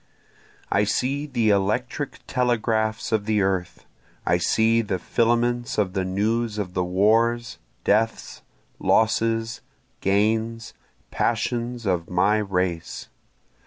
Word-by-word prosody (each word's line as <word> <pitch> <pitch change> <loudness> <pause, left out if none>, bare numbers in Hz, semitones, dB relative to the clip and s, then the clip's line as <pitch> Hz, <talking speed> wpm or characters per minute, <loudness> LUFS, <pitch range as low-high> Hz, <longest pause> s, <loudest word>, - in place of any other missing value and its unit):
I 100 - +3
see 135 +8 -1
the 115 -6 +1
electric 120 +8 -1
telegraphs 115 -3 0
of 110 -2 +1
the 105 -2 +2
earth, 90 -3 -2 0.4
I - - +2
see 115 +1 +3
the 100 -4 -2
filaments 120 +4 0
of 100 -3 +1
the 95 -2 0
news 105 +4 -1
of 95 -4 -3
the 90 - 0
wars, 115 +6 +1 0.2
deaths, 110 +2 0 0.4
losses, 115 0 +1 0.4
gains, 110 +3 0 0.4
passions, 120 +1 -1
of 90 -3 -1
my 100 +4 +2
race. 90 -5 -2
110 Hz, 110 wpm, -24 LUFS, 100-115 Hz, 0.4 s, I